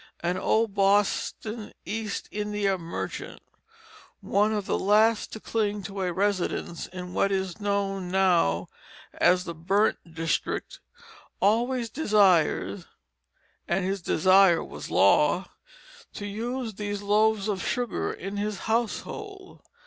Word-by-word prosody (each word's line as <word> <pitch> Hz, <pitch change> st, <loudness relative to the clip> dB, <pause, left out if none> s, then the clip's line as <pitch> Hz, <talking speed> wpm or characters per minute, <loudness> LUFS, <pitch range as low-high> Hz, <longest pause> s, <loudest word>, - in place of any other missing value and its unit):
An 175 Hz, +1 st, 0 dB
old 220 Hz, +3 st, +1 dB
Boston 205 Hz, +2 st, 0 dB
East 210 Hz, +1 st, -4 dB
India 210 Hz, -1 st, -1 dB
merchant, 170 Hz, -2 st, -6 dB, 0.8 s
one 210 Hz, +2 st, +1 dB
of 210 Hz, -2 st, -2 dB
the -, -, 0 dB
last 215 Hz, +2 st, +3 dB
to 220 Hz, -, -7 dB
cling 210 Hz, -2 st, -1 dB
to 195 Hz, +1 st, -5 dB
a 180 Hz, -1 st, 0 dB
residence 185 Hz, -2 st, -1 dB
in 180 Hz, 0 st, -8 dB
what 200 Hz, -, +1 dB
is 190 Hz, -1 st, -2 dB
known 195 Hz, -2 st, -1 dB
now 175 Hz, -, +2 dB, 0.5 s
as 180 Hz, 0 st, +3 dB
the 170 Hz, -, -5 dB
"Burnt 195 Hz, +7 st, +1 dB, 0.2 s
District," 165 Hz, 0 st, -2 dB, 0.6 s
always 235 Hz, +3 st, +1 dB
desired 200 Hz, -, +2 dB, 0.8 s
(and 180 Hz, +2 st, 0 dB
his 195 Hz, 0 st, -2 dB
desire 185 Hz, +1 st, +4 dB
was -, -, -8 dB
law) 150 Hz, -, +3 dB, 0.6 s
to 205 Hz, -, -5 dB
use 230 Hz, +3 st, -4 dB
these 205 Hz, 0 st, -4 dB
loaves 210 Hz, 0 st, +2 dB
of 200 Hz, -3 st, -2 dB
sugar 245 Hz, -1 st, -1 dB
in 195 Hz, +2 st, -6 dB
his 205 Hz, 0 st, -3 dB
household. 375 Hz, -, -3 dB
200 Hz, 120 wpm, -26 LUFS, 185-215 Hz, 0.8 s, desire